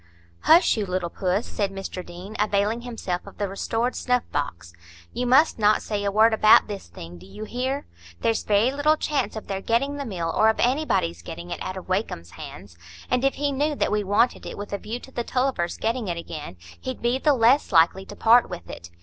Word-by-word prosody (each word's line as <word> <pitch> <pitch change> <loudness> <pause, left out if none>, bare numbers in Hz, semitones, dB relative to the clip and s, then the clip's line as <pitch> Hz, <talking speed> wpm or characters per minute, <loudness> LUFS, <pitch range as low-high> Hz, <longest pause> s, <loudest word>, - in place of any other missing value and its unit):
"Hush, 330 -5 +5
you 210 -2 -1
little 180 -2 -2
puss," 190 +3 -1
said 200 -2 -2
Mr 195 -1 -6
Deane, 180 +5 -10
availing 210 +2 +1
himself 225 -7 -4
of 200 - -12
the 205 - -1
restored 225 +5 -2
snuff 250 -1 +1
box. 90 -12 -4 0.4
"You 250 - -2
must 270 +2 +4
not 210 0 +3
say 205 -2 -2
a 200 - 0
word 220 +2 +5
about 215 0 +6
this 205 -2 -7
thing; 85 0 -10
do 90 - -14
you 210 - -9
hear? 260 +5 -3 0.4
There's 225 -1 +1
very 215 +4 +2
little 295 +3 +2
chance 285 -6 -1
of 220 - -6
their 195 -1 -4
getting 275 +7 0
the 280 - -4
mill 170 -7 -3
or 220 - +5
of 220 - 0
anybody's 240 - +1
getting 85 +1 -8
it - - -5
out 185 0 -4
of 185 - -9
Wakem's 185 - -2
hands. 90 -1 -11 0.3
And 250 0 +2
if 275 - +2
he 285 0 -1
knew 295 +2 0
that - - 0
we 210 0 +1
wanted 205 +5 +1
it - - -7
with 205 0 -7
a 200 - -2
view 230 +5 -5
to 265 - -13
the 240 - -3
Tulliver's 250 -10 -1
getting 230 0 -1
it 170 -1 -2
again, 155 - -7 0.2
he'd 260 -2 -6
be 240 +2 +1
the 295 +1 +3
less 245 +4 +4
likely 175 +2 +4
to - - -9
part 235 +2 +5
with 175 -1 -8
it. 85 - -9
215 Hz, 220 wpm, -24 LUFS, 185-250 Hz, 0.4 s, about